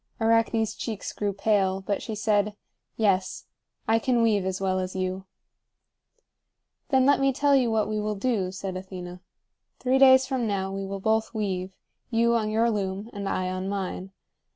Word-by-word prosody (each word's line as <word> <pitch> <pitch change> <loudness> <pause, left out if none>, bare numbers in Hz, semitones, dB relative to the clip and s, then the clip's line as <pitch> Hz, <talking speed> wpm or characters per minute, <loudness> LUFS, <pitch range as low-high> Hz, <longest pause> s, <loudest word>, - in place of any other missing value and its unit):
Arachne's 225 -1 +2
cheeks 215 -1 -5
grew 205 -1 -1
pale, 195 -1 +1
but 200 +1 -2
she 220 - -5
said: 210 -1 +1 0.4
"Yes. 190 -4 0 0.4
I 225 +1 +3
can 240 0 +2
weave 205 -4 +2
as 190 0 -2
well 190 -1 0
as 185 0 -4
you." 185 0 -3 1.6
"Then 265 -3 +4
let 285 +1 +4
me 275 0 +3
tell 280 +2 +3
you 255 -3 +3
what 220 -1 +1
we 215 0 -2
will 210 0 -2
do," 200 -4 -1
said 190 0 -5
Athena. 180 -1 -8 0.6
"Three 260 +1 +1
days 260 -1 +7
from 255 -3 -1
now 195 -2 -2
we 195 0 -4
will 195 0 -5
both 220 +3 0
weave; 190 -3 -2 0.4
you 235 0 +2
on 220 -2 +1
your 225 +2 +2
loom, 200 +1 -3
and 200 -2 -4
I 185 0 -1
on 185 +1 -3
mine. 195 -1 -4
210 Hz, 175 wpm, -26 LUFS, 190-230 Hz, 1.6 s, days